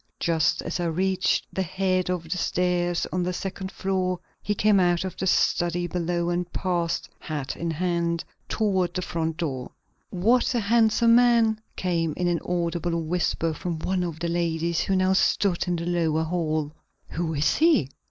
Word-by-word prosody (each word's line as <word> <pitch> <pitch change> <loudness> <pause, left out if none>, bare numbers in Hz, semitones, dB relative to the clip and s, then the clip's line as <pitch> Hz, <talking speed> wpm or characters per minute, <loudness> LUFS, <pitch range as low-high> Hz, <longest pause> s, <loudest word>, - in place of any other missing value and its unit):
Just 165 -2 +1
as 170 - -3
I 175 - 0
reached 185 +3 +1
the 190 - -1
head 185 0 0
of 180 -2 -1
the 165 +2 -3
stairs 175 -1 0
on 180 - 0
the 180 +1 0
second 190 +1 -5
floor 185 -2 -1 0.2
he 210 - -1
came 210 -1 +4
out 175 -1 +2
of 185 - -5
the 190 - -2
study 175 -1 +2
below 175 0 -1
and 175 0 -2
passed, 175 -3 -1
hat 145 -3 -4
in 170 - -3
hand, 170 0 -1 0.3
toward 190 -5 0
the 185 - -1
front 165 -2 -2
door. 135 -7 -3 0.4
"What 230 +7 +2
a - - +3
handsome 230 +1 +4
man!" 230 -2 +4
came 165 -4 -1
in 180 - 0
an 175 -1 +1
audible 170 -1 -1
whisper 165 0 0
from 170 +1 -4
one 185 +3 -1
of 165 -3 -4
the 170 - -2
ladies, 170 -1 0
who 195 - 0
now 185 0 +3
stood 190 -1 +2
in 175 - +1
the 170 0 -3
lower 165 -2 +1
hall. 155 -3 -1 0.4
"Who 160 -1 -2
is 145 +1 +2
he?" 305 - +4
175 Hz, 175 wpm, -25 LUFS, 165-190 Hz, 0.4 s, came